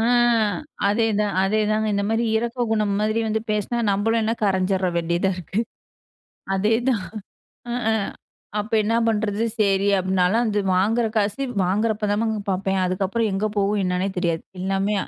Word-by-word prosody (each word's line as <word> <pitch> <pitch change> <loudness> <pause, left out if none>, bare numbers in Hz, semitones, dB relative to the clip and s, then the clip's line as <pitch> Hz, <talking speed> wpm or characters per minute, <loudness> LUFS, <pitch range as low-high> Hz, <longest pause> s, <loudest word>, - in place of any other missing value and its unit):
அ. - - +1 0.9
அதேதான். 210 -1 +1
அதேதாங்க 215 +2 +1
இந்த 200 0 0
மாதிரி 225 +1 +1
இரக்க 235 +2 -1
குணம் 210 -2 +1
மாதிரி 215 +2 +1
வந்து 220 0 0
பேசினா 210 +3 -1
நம்மளும் 225 +3 +1
என்ன 225 +1 +1
கரைஞ்சிர 190 -1 +1
வேண்டியதா 170 +3 +1
இருக்கு. 180 -4 -10 1.0
அதேதான். 225 +2 +1 0.7
அ - - -1 0.2
அ. - - +2 0.7
அப்ப 215 +2 -5
என்ன 225 +2 +1
பண்ணுறது, 215 0 0
சரி 200 -1 +2
அப்படினாலும், 185 +3 +2
அந்த 210 -1 0 0.2
வாங்குற 220 +6 +2
காசு 210 +6 0 0.2
வாங்குறப்போதமா 210 +2 0 0.3
பார்ப்பேன். 190 0 0
அதுக்கப்புறம் 195 +5 0
எங்கே 195 +3 0
போகும் 200 0 +1
என்னன்னே 180 +1 0
தெரியாது. 170 -2 -1 0.2
எல்லாமே 195 +2 0
205 Hz, 135 wpm, -23 LUFS, 195-220 Hz, 1.0 s, அ